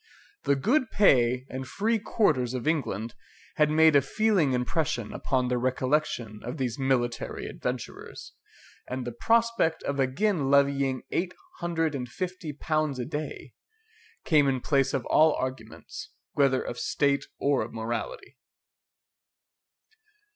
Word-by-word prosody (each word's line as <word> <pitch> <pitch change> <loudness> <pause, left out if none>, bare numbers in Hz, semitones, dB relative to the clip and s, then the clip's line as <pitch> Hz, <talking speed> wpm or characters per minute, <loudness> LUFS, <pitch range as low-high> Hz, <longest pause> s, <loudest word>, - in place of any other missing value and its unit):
The 140 - +3
good 240 - +1
pay 125 - +4
and 130 0 -6
free 220 - 0
quarters 140 - +1
of 125 +3 -4
England 120 -8 -1 0.4
had 150 -1 +4
made 160 0 +5
a 140 - +7
feeling 185 -2 +2
impression 125 -2 -1
upon 130 -2 0
the 125 0 0
recollection 130 -3 -1
of 125 +5 -5
these 130 -2 -2
military 125 -3 -1
adventurers, 125 -1 -6 0.6
and 130 0 -3
the 120 - -3
prospect 230 - +1
of 140 0 -2
again 140 +3 +1
levying 140 -2 +2
eight 180 +1 -1 0.2
hundred 165 -2 0
and 125 -3 -4
fifty 180 +1 -4
pounds 155 -1 -1
a 125 - -3
day, 150 +4 -6 0.7
came 150 -3 +4
in 130 -1 +1
place 135 0 +1
of 130 - -2
all 155 0 +5
arguments, 130 - -6 0.2
whether 135 -3 +2
of 120 - -5
state 140 -1 +1
or 140 -1 +1
of 115 - -5
morality. 115 - -5
140 Hz, 135 wpm, -27 LUFS, 125-160 Hz, 0.7 s, a